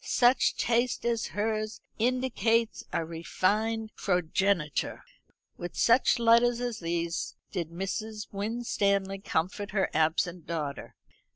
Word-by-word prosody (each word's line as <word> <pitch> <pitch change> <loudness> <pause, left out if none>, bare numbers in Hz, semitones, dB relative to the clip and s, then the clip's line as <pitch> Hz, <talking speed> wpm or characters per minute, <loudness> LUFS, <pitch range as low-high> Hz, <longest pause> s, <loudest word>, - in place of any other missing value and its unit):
Such 245 +1 +3
taste 240 +1 +1
as 235 -1 0
hers 215 +1 -2 0.2
indicates 230 -2 +1
a 165 - -1
refined 215 +7 -1
progeniture." 180 -2 0 0.5
With 175 - -6
such 235 +3 +4
letters 235 +1 +4
as 245 -2 -3
these 170 0 -2 0.2
did 170 -5 -3
Mrs. 210 +5 -4
Winstanley 200 -2 0
comfort 195 +3 -2
her 195 -2 +1
absent 160 +2 +1
daughter. 150 -4 -4
205 Hz, 105 wpm, -29 LUFS, 175-230 Hz, 0.5 s, such